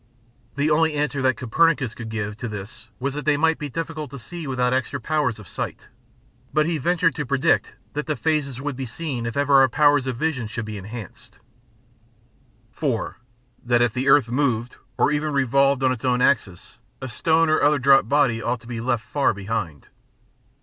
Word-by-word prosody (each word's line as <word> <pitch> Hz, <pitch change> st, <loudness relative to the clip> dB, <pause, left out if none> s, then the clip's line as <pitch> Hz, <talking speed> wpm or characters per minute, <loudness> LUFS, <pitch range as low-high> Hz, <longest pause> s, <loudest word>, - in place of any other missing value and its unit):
The 145 Hz, +2 st, +1 dB
only 160 Hz, 0 st, +3 dB
answer 145 Hz, -2 st, -1 dB
that 130 Hz, -1 st, +2 dB
Copernicus 135 Hz, -1 st, +1 dB
could 115 Hz, -1 st, -8 dB
give 110 Hz, -1 st, -3 dB
to 120 Hz, -, -5 dB
this 105 Hz, +5 st, -8 dB
was 135 Hz, +2 st, -2 dB
that 150 Hz, +1 st, -4 dB
they 150 Hz, 0 st, +2 dB
might 160 Hz, +2 st, +2 dB
be 150 Hz, -, -4 dB
difficult 155 Hz, 0 st, -5 dB
to 140 Hz, -, -8 dB
see 160 Hz, +6 st, -8 dB
without 125 Hz, -1 st, 0 dB
extra 130 Hz, +2 st, -1 dB
powers 140 Hz, -2 st, 0 dB
of 105 Hz, -4 st, -12 dB
sight, -, -, -6 dB, 0.6 s
but 155 Hz, 0 st, +2 dB
he 165 Hz, -1 st, -1 dB
ventured 165 Hz, +2 st, +2 dB
to 150 Hz, -, -3 dB
predict 140 Hz, +4 st, +1 dB, 0.2 s
that 150 Hz, +1 st, -3 dB
the 150 Hz, -, 0 dB
phases 150 Hz, -5 st, -1 dB
would 145 Hz, 0 st, -3 dB
be 130 Hz, 0 st, -5 dB
seen 125 Hz, -2 st, -4 dB
if 115 Hz, -, -4 dB
ever 140 Hz, -1 st, +5 dB
our 135 Hz, -, +5 dB
powers 145 Hz, 0 st, +3 dB
of 125 Hz, -2 st, -3 dB
vision 135 Hz, -5 st, -1 dB
should 115 Hz, 0 st, -5 dB
be 105 Hz, -1 st, -6 dB
enhanced. 105 Hz, 0 st, -10 dB, 1.3 s
4. 130 Hz, -7 st, -2 dB, 0.4 s
That 120 Hz, 0 st, +3 dB
if 120 Hz, -2 st, +1 dB
the 130 Hz, +2 st, 0 dB
earth 135 Hz, -4 st, +5 dB
moved, 125 Hz, -3 st, 0 dB, 0.2 s
or -, -, +3 dB
even 150 Hz, 0 st, -1 dB
revolved 140 Hz, 0 st, +2 dB
on 130 Hz, -, +4 dB
its 125 Hz, -3 st, -4 dB
own 125 Hz, -1 st, +2 dB
axis, 110 Hz, -10 st, 0 dB, 0.2 s
a 130 Hz, -, -5 dB
stone 160 Hz, +6 st, +2 dB
or 155 Hz, -, +2 dB
other 150 Hz, +1 st, +4 dB
dropped 135 Hz, 0 st, +4 dB
body 140 Hz, -6 st, +2 dB
ought 125 Hz, -1 st, -2 dB
to 115 Hz, -, -16 dB
be 120 Hz, -2 st, -5 dB
left 120 Hz, -2 st, -1 dB
far 140 Hz, -1 st, +1 dB
behind. 95 Hz, -, -4 dB
135 Hz, 195 wpm, -23 LUFS, 120-150 Hz, 1.3 s, ever